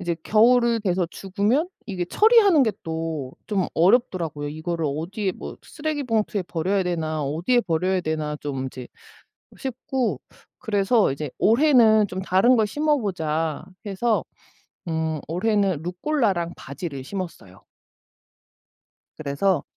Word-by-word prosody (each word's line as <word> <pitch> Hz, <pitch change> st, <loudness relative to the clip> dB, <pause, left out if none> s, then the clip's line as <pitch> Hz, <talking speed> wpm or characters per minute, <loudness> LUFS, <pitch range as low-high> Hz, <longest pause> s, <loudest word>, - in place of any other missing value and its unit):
이제 175 Hz, -3 st, -2 dB
겨울을 235 Hz, +1 st, +4 dB
돼서 180 Hz, -3 st, 0 dB
죽으면 205 Hz, -, 0 dB, 0.2 s
이게 185 Hz, -4 st, -3 dB
처리하는 410 Hz, -, +5 dB
게 220 Hz, -, +1 dB
또 160 Hz, -5 st, -4 dB
좀 195 Hz, -4 st, 0 dB
어렵더라고요. 170 Hz, -, +2 dB
'이거를 160 Hz, +2 st, -3 dB
어디에 185 Hz, +7 st, -2 dB
뭐 -, -, -8 dB
쓰레기 305 Hz, -2 st, -4 dB
봉투에 220 Hz, -4 st, 0 dB
버려야 185 Hz, +3 st, -1 dB
되나. 160 Hz, -4 st, -2 dB
어디에 170 Hz, -, +1 dB
버려야 185 Hz, 0 st, 0 dB
되나.' 155 Hz, -2 st, -2 dB
좀 135 Hz, -2 st, -3 dB
이제 130 Hz, -1 st, -8 dB, 0.7 s
싶고 260 Hz, -1 st, -2 dB, 0.4 s
그래서 210 Hz, -, +2 dB
이제 145 Hz, +1 st, -4 dB
'올해는 230 Hz, -4 st, +5 dB
좀 185 Hz, 0 st, -5 dB
다른 190 Hz, +7 st, +4 dB
걸 220 Hz, -2 st, +3 dB
심어보자.' 190 Hz, -, -1 dB, 0.2 s
해서 215 Hz, +3 st, 0 dB, 0.7 s
음 160 Hz, -1 st, -1 dB
올해는 195 Hz, -1 st, +1 dB
루꼴라랑 180 Hz, -, -1 dB
바질을 140 Hz, 0 st, -6 dB
심었어요. 165 Hz, -, -7 dB, 1.5 s
그래서 155 Hz, +4 st, 0 dB
185 Hz, 280 characters per minute, -24 LUFS, 160-225 Hz, 1.5 s, 처리하는